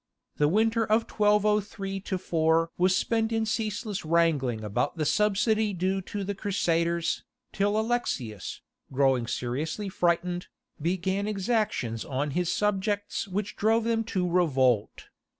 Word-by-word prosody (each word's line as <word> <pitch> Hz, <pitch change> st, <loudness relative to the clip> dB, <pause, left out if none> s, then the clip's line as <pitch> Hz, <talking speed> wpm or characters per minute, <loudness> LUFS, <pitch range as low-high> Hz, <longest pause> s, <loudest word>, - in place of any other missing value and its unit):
The 145 Hz, -, +3 dB
winter 225 Hz, +6 st, +2 dB
of 220 Hz, +1 st, +2 dB
1203 210 Hz, -2 st, +1 dB
4 165 Hz, -3 st, +1 dB
was 185 Hz, +1 st, +3 dB
spent 225 Hz, +1 st, 0 dB
in 225 Hz, -1 st, +1 dB
ceaseless 215 Hz, -2 st, -2 dB
wrangling 155 Hz, -9 st, +1 dB
about 115 Hz, -, -1 dB
the 155 Hz, -, 0 dB
subsidy 210 Hz, +3 st, +2 dB
due 190 Hz, +2 st, 0 dB
to 200 Hz, +2 st, -5 dB
the 200 Hz, +1 st, -2 dB
Crusaders, 170 Hz, -4 st, 0 dB, 0.3 s
till 205 Hz, +2 st, +1 dB
Alexius, 145 Hz, -, -2 dB, 0.3 s
growing 130 Hz, -3 st, +2 dB
seriously 145 Hz, -, -3 dB
frightened, 175 Hz, 0 st, 0 dB, 0.3 s
began 190 Hz, +4 st, -1 dB
exactions 200 Hz, -, -1 dB
on 140 Hz, +2 st, -2 dB
his 175 Hz, +3 st, 0 dB
subjects 205 Hz, +1 st, -1 dB
which 200 Hz, +2 st, -3 dB
drove 225 Hz, +2 st, +2 dB
them 225 Hz, 0 st, +1 dB
to 185 Hz, -5 st, -1 dB
revolt. 135 Hz, -, +1 dB
190 Hz, 125 wpm, -27 LUFS, 160-210 Hz, 0.3 s, The